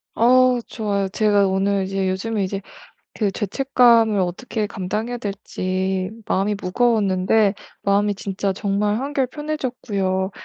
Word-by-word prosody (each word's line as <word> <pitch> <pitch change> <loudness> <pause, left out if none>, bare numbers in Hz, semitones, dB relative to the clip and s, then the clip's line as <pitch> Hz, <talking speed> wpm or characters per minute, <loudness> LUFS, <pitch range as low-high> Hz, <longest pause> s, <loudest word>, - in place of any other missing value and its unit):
어 250 +1 +5
좋아요. 205 -4 -2
제가 205 -1 +3
오늘 195 +1 +1
이제 190 0 -1
요즘에 205 +3 -1
이제 195 +1 -3 0.5
그 205 -3 0
죄책감을 230 0 +3
어떻게 210 +5 -2
감당해야 210 +5 -3
될지 190 -3 -2 0.2
마음이 200 +2 0
무거웠는데 200 -1 +2 0.3
마음이 205 +1 +2
진짜 195 0 -2
정말 205 +1 0
한결 275 -1 -1
편해졌고요. 240 -11 -2
205 Hz, 295 characters per minute, -21 LUFS, 190-230 Hz, 0.5 s, 어